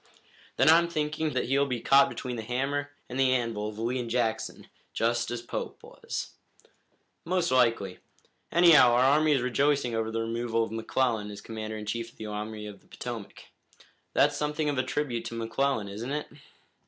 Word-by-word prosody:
"Then - - +3
I'm 165 +2 +7
thinking 155 -1 -2
that 130 - 0
he'll 140 +2 +2
be 125 -3 -2
caught 140 +3 +5
between 125 -2 -5
the 115 - -4
hammer 135 +5 -2 0.2
and 130 +1 -5
the 130 -1 +4
anvil 115 -4 -1
of 105 - -10
Lee 120 +3 -1
and 120 -1 -4
Jackson, 115 -2 -1 0.3
just 120 +1 0
as 120 -1 -4
Pope - - -5
was." - - -6 0.9
"Most 180 0 0
likely. 115 -7 +2 0.5
Anyhow, 165 -8 +7
our 125 +1 +4
army 150 +3 +4
is 130 -3 +1
rejoicing 135 0 +1
over 115 0 -1
the 115 0 -2
removal 115 0 -1
of 110 - -5
McClellan 115 -1 0
as 100 -1 -8
commander 110 0 -6
in 105 - -7
chief 115 +2 -3
of - - -30
the 110 - -7
Army 105 0 -5
of 105 -2 -9
the - - -28
Potomac. - - -8 0.6
That's - - +4
something 150 0 -1
of 140 -3 -1
a - - +2
tribute 130 -2 -2
to 115 - -5
McClellan, 115 0 -1
isn't 110 +6 -5
it?" 150 +1 -2
120 Hz, 185 wpm, -28 LUFS, 115-140 Hz, 0.9 s, I'm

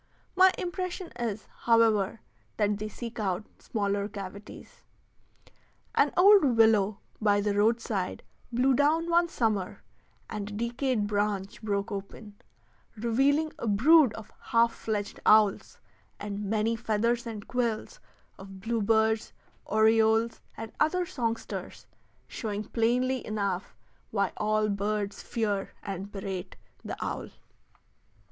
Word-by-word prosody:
My 375 +1 +7
impression 365 0 -4
is, 225 -3 -3 0.2
however, 225 -3 +3 0.4
that 210 -1 +2
they 215 +1 -4
seek 235 +1 -7
out 195 0 -1
smaller 200 -1 -2
cavities. 200 0 -10 1.1
An - - +3
old 395 +1 +7
willow 215 -3 +4 0.2
by 205 -1 +3
the 205 0 0
roadside 210 -2 0 0.3
blew 255 +3 +3
down 315 +5 +2
one 345 0 +4
summer, 215 - -1 0.4
and 210 -1 -5
a - - -8
decayed 235 +1 -1
branch 205 -1 -2
broke 200 0 -2
open, 205 +1 -8 0.6
revealing 275 +8 +2
a 235 - -3
brood 265 +6 +6
of 220 -1 -10
half 230 0 +3
fledged 210 -2 -4
owls, 215 -2 +4 0.4
and 205 0 -4
many 220 +2 +1
feathers 230 +2 0
and 215 -3 -7
quills 245 - -2 0.4
of 195 0 -10
bluebirds, 220 0 +1 0.3
orioles, 220 +1 +3 0.2
and 225 0 -6
other 355 +4 +2
songsters, 230 -7 -4 0.4
showing 210 -3 -4
plainly 250 +4 0
enough 200 -3 -3 0.3
why 200 -3 0
all 215 0 +1
birds 205 0 -2
fear 205 -4 -2
and 195 +1 -5
berate 195 -2 -5 0.3
the - - -5
owl. - - -4
220 Hz, 115 wpm, -28 LUFS, 205-235 Hz, 1.1 s, My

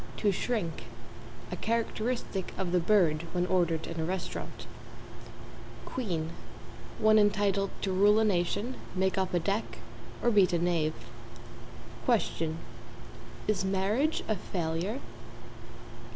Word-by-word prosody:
t., - - -8
To 205 - +5
shrink 195 -5 -2 0.7
a - - -1
characteristic 230 -3 -2
of 185 -2 -1
the 180 - +4
bird 170 -4 +3
when 180 0 +1
ordered 170 -3 +1
in 165 -1 -5
a - - 0
restaurant. 185 +3 -4 1.2
=QUEEN= 170 -10 -2 0.7
One 215 0 +5
entitled 200 -1 +2
to 195 - +1
rule 205 +3 +5
a 220 - +4
nation, 205 +5 0 0.2
make 190 +1 +1
up 190 -1 0
a - - +4
deck, 200 +6 -2 0.5
or 240 - +4
beat 200 -4 +5
a - - +4
knave. 165 -2 +1 1.1
=QUESTION= 160 -1 +1 0.9
Is 210 -3 +1
marriage 200 +11 +1
a 215 - +1
failure? 175 +7 -2
190 Hz, 125 wpm, -30 LUFS, 175-215 Hz, 1.2 s, To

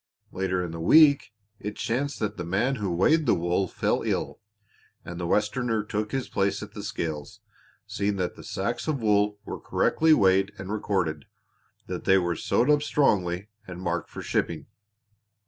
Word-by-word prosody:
Later 95 -1 -1
in 85 - -6
the 85 - -6
week 140 - +5 0.3
it 105 +1 -5
chanced 140 +5 -2
that 105 -1 -1
the 90 - -5
man 110 +10 0
who 100 -4 -2
weighed 150 - +3
the - - +5
wool 85 +3 0
fell - - 0
ill - - -2 0.7
and 85 0 -7
the 85 - -2
Westerner 110 +3 0
took 105 0 -3
his 135 -2 -2
place 100 0 -1
at - - -10
the - - -7
scales, 80 +6 -5 0.5
seeing 100 -1 -1
that 90 -2 -2
the - - -12
sacks - - -3
of 150 -3 0
wool 105 -2 +2
were - - -6
correctly 160 0 +2
weighed 95 -1 +3
and 95 0 -6
recorded, 90 -8 -1 0.6
that - - -6
they 95 - +5
were 85 -2 0
sewed 125 - +2
up 150 -1 +4
strongly, 100 -10 +1 0.2
and 90 -1 -8
marked 85 -1 -2
for - - -8
shipping. 85 -2 -1
100 Hz, 175 wpm, -26 LUFS, 90-110 Hz, 0.7 s, week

